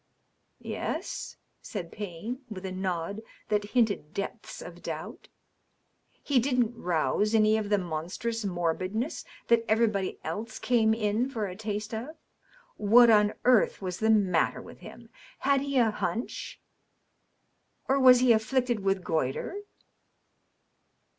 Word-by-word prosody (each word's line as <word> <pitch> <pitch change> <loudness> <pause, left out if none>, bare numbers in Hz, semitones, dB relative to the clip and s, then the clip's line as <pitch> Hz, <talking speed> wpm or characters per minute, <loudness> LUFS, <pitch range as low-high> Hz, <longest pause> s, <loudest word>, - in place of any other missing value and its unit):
"Yes?" - - -5 0.2
said 180 -6 -6
Payne, 210 +5 -6
with 195 -3 -7
a 190 - -4
nod 185 +1 -3 0.3
that 210 -1 +1
hinted 205 -9 +1
depths 195 - -5
of - - -10
doubt. - - -7 1.0
"He 280 -3 +3
didn't 245 -2 +1
rouse 190 +4 0
any 215 0 +5
of 215 -2 -2
the 205 - +3
monstrous 185 +7 -3
morbidness 185 - -2 0.2
that 235 -1 +4
everybody 215 -3 +1
else 220 +1 -5
came 220 -3 +2
in 225 +3 0
for 225 -5 -3
a 185 -2 -6
taste 210 +1 -4
of? 255 +9 -5 0.6
What 230 +3 +6
on 210 -1 +4
earth 250 -3 +4
was 185 -2 -4
the 220 - +1
matter 195 -6 +3
with - - -12
him? - - -12 0.3
Had 280 -1 +2
he 280 -1 -1
a 230 -3 +4
hunch? 225 +3 -4 1.3
Or 275 +1 +3
was 255 -2 +7
he 255 -1 +5
afflicted 240 +1 +1
with 195 -1 0
goitre 155 - -1
215 Hz, 130 wpm, -28 LUFS, 190-235 Hz, 1.3 s, was